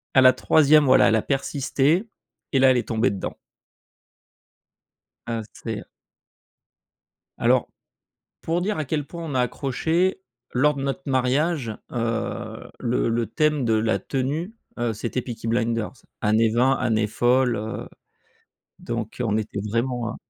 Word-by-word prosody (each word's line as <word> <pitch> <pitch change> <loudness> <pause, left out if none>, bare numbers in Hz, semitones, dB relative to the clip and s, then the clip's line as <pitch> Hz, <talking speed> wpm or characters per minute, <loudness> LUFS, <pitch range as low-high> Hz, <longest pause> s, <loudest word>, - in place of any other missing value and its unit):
à 130 - +7
la 130 0 +8
3e 150 +1 +5
voilà 130 - +6
elle 110 - +3
a 110 - +2
persisté 140 - 0 0.4
et 135 - +3
là 130 0 +6
elle 125 - +3
est 120 -4 -2
tombée 115 -1 +2
dedans. 100 - -5 1.9
Ah 115 -1 -1
c'est, 115 -1 -5
heu - - -9 1.6
Alors, - - +3 0.7
pour 170 +2 -1
dire 205 -1 -1
à 155 - -2
quel 145 +1 -2
point 170 +1 -8
on 150 -4 -4
a 125 - +3
accroché, 160 +9 0 0.3
lors 150 +4 +3
de 140 - -5
notre 140 +7 -3
mariage, 135 0 +1 0.2
heu, 115 -1 -3
le 120 -1 0
le 115 0 0
thème 150 +2 +1
de 115 -2 +2
la 110 -3 +1
tenue, 145 - -3 0.2
heu, 120 -2 0
c'était 115 +4 -3
Peaky 115 -2 -7
Blinders, 115 0 -1 0.2
années 110 +1 +3
20, 125 +4 +3
années 110 -2 +1
folles, 120 +3 +2
heu, 110 +2 -5 0.9
donc, 115 -1 -5
heu, 125 - +1
on 110 -1 +1
était 105 -1 -4
vraiment, 120 0 -1
hein. - - -7
125 Hz, 150 wpm, -24 LUFS, 115-145 Hz, 1.9 s, la